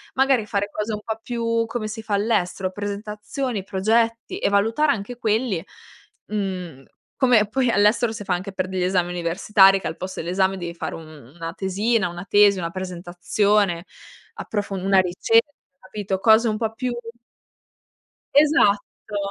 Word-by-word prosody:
Magari 265 -4 +3
fare 205 -1 -2
cose 210 +2 -4
un 210 - -3
po' 220 0 -3
più 230 -1 -1
come 225 -2 -4
si 220 +1 -6
fa 210 -2 -1
all'estero: 195 -3 0
presentazioni, 210 +3 -4
progetti 225 +4 0
e - - +1
valutare 225 +9 +2
anche 230 0 -4
quelli, 220 -5 0 0.6
mhmm, 185 -9 -4 0.3
come 245 -5 +4
poi 250 +3 0
all'estero 220 +3 +3
si 220 -2 -6
fa 190 - 0
anche 185 +3 -4
per 185 -1 -2
degli 185 -1 -2
esami 180 -1 +1
universitari, 190 +3 +4
che - - -5
al 160 - -4
posto 185 +1 -6
dell'esame 190 +3 0
devi 170 -1 -5
fare - - -5
un 155 -6 -12
una 165 0 -6
tesina, 195 +1 0
una 175 +2 -8
tesi, 205 -1 +5
una 170 0 -3
presentazione, 185 +1 0 0.5
approfon 200 -3 -4
una 195 0 +4
ricerca, 225 +9 +2 0.3
capito? 190 0 -4
Cose 220 +2 +5
un 215 - -1
po' 225 -1 -2
più 250 +2 -3 1.4
Esatto. 250 -9 +2
205 Hz, 150 wpm, -23 LUFS, 185-225 Hz, 1.4 s, tesi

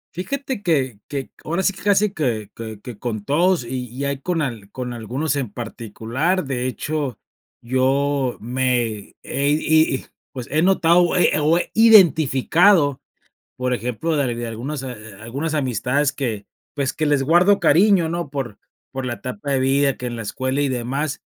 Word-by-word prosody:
Fíjate 265 +5 -4
que 135 - 0
que, 140 -2 -5
ahora 170 +4 -1
sí 195 - +2
que 190 - -12
casi 205 0 +3
que 115 - -2
que 110 -2 -7
que 120 -5 -9
con 110 -4 -4
todos 170 - +2
y 125 +1 -4
y 130 +4 -5
ahí 140 -1 -2
con 170 -1 -1
al 115 -7 -5
con 125 +2 -5
algunos 130 +6 -2
en 130 -7 -3
particular. 120 - -2
De 130 -2 -2
hecho, 140 -1 -3 0.5
yo 130 +1 +1
me 120 -3 -1
he 140 +1 -1
y 155 -1 +3
y - - -6 0.3
pues 125 -4 -7
he 155 +2 +2
notado, 175 -1 +4
o 175 0 +1
he - - +4
o 155 +3 +3
he 175 - -3
identificado, 170 - +5 0.6
por 125 0 -1
ejemplo, 125 +7 -1
de 130 -4 0
de 120 0 -4
algunas 125 +6 -5
a 130 - -5 0.3
algunas 140 +7 -3
amistades 135 +1 0
que, 115 -7 -3 0.3
pues, 140 -3 -1
que 155 - -1
les 145 -2 +2
guardo 175 +7 +4
cariño, 175 +1 +4
¿no? 170 -1 -3
Por 135 -7 -5 0.3
por 130 -1 -4
la 120 - -2
etapa 125 +3 -5
de 135 - +1
vida, 135 +1 +2
que - - -9
en 120 -1 -3
la 115 - -5
escuela 130 +6 -2
y 145 - +1
demás, 130 +4 -3
135 Hz, 175 wpm, -21 LUFS, 125-160 Hz, 0.6 s, identificado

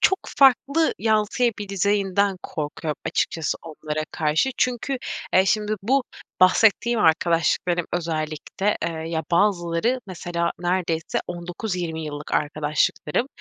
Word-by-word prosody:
çok 385 - +4 0.2
farklı 280 +4 +4
yansıyabileceğinden 205 -3 +1
korkuyorum 150 0 -4
açıkçası 160 -2 -1
onlara 155 -1 -4
karşı. 155 +10 +1
Çünkü, 255 +2 0 0.4
eee, 185 - +6
şimdi 210 +1 +1
bu 260 +5 +2 0.4
bahsettiğim 220 +5 +4
arkadaşlıklarım 170 +1 +2
özellikle, 160 +4 -2
eee, 170 +1 -1 0.2
ya, 160 -1 -1
bazıları 175 +5 +2
mesela 170 -2 -2
neredeyse 175 -2 -1
19-20 175 -1 -4
yıllık 145 -1 -7
arkadaşlıklarım. 150 - 0
175 Hz, 100 wpm, -23 LUFS, 160-210 Hz, 0.4 s, eee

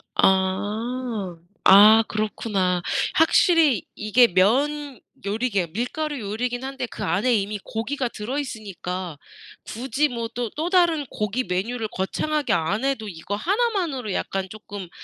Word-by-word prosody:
아. 205 +1 0 0.3
아 215 +3 +8
그렇구나. 200 -4 -1 0.3
확실히 320 - +4
이게 225 +3 +4
면 265 +8 +1 0.3
요리 225 +5 -1
계열 185 -6 -1
밀가루 285 - -3
요리긴 240 +4 -3
한데 270 -1 -4
그 - - -6
안에 200 +9 +1
이미 205 +1 -1
고기가 250 +3 -3
들어 235 +7 -5
있으니까 185 - -5 0.5
굳이 265 +5 -1
뭐 235 -2 -3
또 240 -2 -2
또 325 +3 -1
다른 340 -5 +3
고기 210 +4 -2
메뉴를 215 +6 -2
거창하게 295 +11 -1
안 175 +7 0
해도 270 -6 -1
이거 190 +2 -5
1 415 - +1
만으로 295 - -2
약간 190 0 -2
쪼끔 205 -3 -9
225 Hz, 265 characters per minute, -23 LUFS, 200-270 Hz, 0.5 s, 아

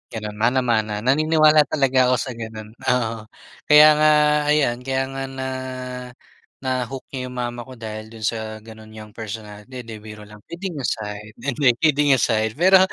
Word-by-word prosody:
gano'n, 105 -1 -6
mana-mana. 115 -3 +1
Naniniwala 155 +2 +4
talaga 135 -4 +2
ako 125 - +3
sa 130 +2 -3
gano'n, 110 -2 -8
oo. 115 -3 -2 0.4
Kaya 150 +1 +9
nga 155 0 +5 0.4
ayan, 145 -5 +2
kaya 130 +1 -1
nga 135 0 -4
na, 130 0 -5 1.2
na-hoo 130 0 -3
niya 130 -2 -4
‘yong 125 - -9
mama 120 0 -5
ko 130 - -10
dahil 110 -2 -7
do'n 110 0 -12
sa 110 +2 0 0.2
gano'n 110 -1 -13
niyang 110 -1 -11
personality, 110 +3 -8
'di, 115 -2 -9
biro 105 0 -11
lang, 105 0 -14
kidding 175 -3 -6
aside, 105 -3 -4
'di, 145 - -5
hindi, 140 +1 +1 0.2
kidding 145 -2 +4
aside. 110 -3 0
Pero 185 +5 +6
120 Hz, 165 wpm, -22 LUFS, 110-135 Hz, 1.2 s, Kaya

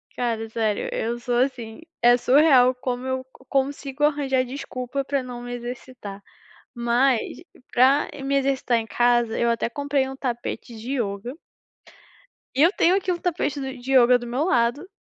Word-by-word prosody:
Cara, 225 -2 -2
sério, 220 -2 -1
eu 235 +2 -2
sou 240 0 -1
assim. 245 -1 -2 0.2
É 240 0 +6
surreal 255 -1 +5
como 250 0 -4
eu 260 0 -2
co 260 - -20
consigo 275 +1 -2
arranjar 280 -3 +2
desculpa 265 0 -5
pra 275 0 -1
não 245 -1 -7
me 245 0 -6
exercitar, 240 -4 -8 0.5
mas 240 +1 +2 0.5
pra 265 +4 +4 0.2
me 275 +1 0
exercitar 265 -3 +1
em 225 - -2
casa 240 -2 +2
eu 235 - +2
até 230 0 0
comprei 280 +1 -1
um 270 - -7
tapete 240 -2 -5
de 235 +5 -5
ioga 235 +2 -3 1.2
e 275 - +3
eu 335 - +7
tenho 365 -2 +3
aqui 375 -2 0
o 345 - -3
tapete 315 -5 -1
do 265 0 -5
de 255 +2 -4
ioga 250 -1 +6
do 240 - -8
meu 250 +5 -1
lado, 255 0 +1
255 Hz, 170 wpm, -24 LUFS, 240-275 Hz, 1.2 s, eu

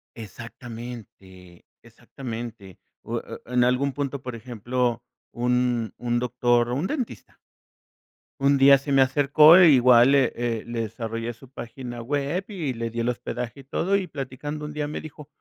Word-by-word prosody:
Exactamente, 115 -5 -10 0.2
exactamente. 115 -4 -9 0.2
U - - -3
e - - -7
e 125 - -10
en 125 -1 +4
algún 125 +3 +1
punto, 140 -1 -3
por 125 -2 -6
ejemplo, 120 +1 -2 0.3
un 125 -2 0
un 120 0 -1
doctor, 120 0 +1
o, 120 - -1
un 155 +8 -1
dentista. 265 -7 -5 1.0
Un 140 0 +4
día 140 +1 +7
se 140 +1 -4
me 135 - +5
acercó, 145 +5 +6
e, 180 -3 +8
igual 125 -2 +6
le 135 -3 +4
eh, 115 -2 -2
le 115 -1 -3
desarrollé 115 +1 -5
su 125 +3 -17
página 120 -1 -8
web, 145 +8 -2
y 170 - -3
le 115 0 -4
di 115 +1 -3
el 120 - 0
hospedaje 125 +2 -5
y - - -18
todo, 190 +8 0
y 185 -2 -3
platicando 145 +1 -6
un 150 - -5
día 150 0 -3
me 150 - -5
dijo: 150 -1 -11
125 Hz, 165 wpm, -24 LUFS, 115-140 Hz, 1.0 s, e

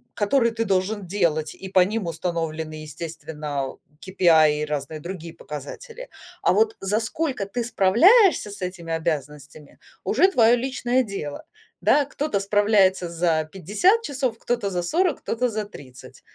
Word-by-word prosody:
которые 235 +3 +2
ты 230 0 -1
должен 195 +1 -1
делать, 165 -5 0
и 190 - -9
по 185 -1 +4
ним 200 0 0
установлены, 160 -2 -3
естественно, 150 -2 -6 0.2
KPI 160 -5 +3
и - - -1
разные 150 +1 -4
другие 170 0 -7
показатели. 460 - -9 0.3
А - - +3
вот 440 0 +2
за 205 +3 0
сколько 255 -2 -2
ты 235 +5 -3
справляешься 240 - +4
с 200 -1 -10
этими 180 -2 -5
обязанностями- 150 -2 -5 0.2
уже 375 - +3
твоё 235 -5 +5
личное 255 0 0
дело, 200 - -6 0.4
да. 295 - +4
Кто-то 285 -7 -2
справляется 200 -3 +3
за 165 -2 0
50 215 - +2
часов, 265 - -2
кто-то 235 -5 -1
за 180 -2 -2
40, 340 - +1
кто-то 245 +2 -1
за 215 -1 -3
30. 130 -10 -13
195 Hz, 145 wpm, -23 LUFS, 160-235 Hz, 0.4 s, твоё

